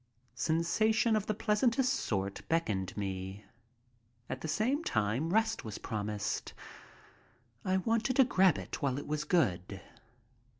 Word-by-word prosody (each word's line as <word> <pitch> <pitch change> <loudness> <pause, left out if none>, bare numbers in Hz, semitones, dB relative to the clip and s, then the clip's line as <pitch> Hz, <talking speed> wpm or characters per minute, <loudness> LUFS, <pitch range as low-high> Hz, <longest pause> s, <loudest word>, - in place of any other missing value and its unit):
Sensation 215 - +2
of 210 -2 -1
the 215 - 0
pleasantest 235 +5 +2
sort 100 - -2
beckoned 105 - 0
me, 95 0 -4 0.9
at 130 - -4
the - - -4
same 245 - 0
time 115 - 0
rest 220 +2 +1
was 110 -2 -6
promised. 105 -1 -3 1.1
I 185 0 +1
wanted 230 +6 +1
to 270 - +7
grab 190 - +4
it - - -6
while 135 -3 0
it 145 - -5
was 150 0 -2
good. 100 - +1
160 Hz, 130 wpm, -32 LUFS, -, 1.1 s, to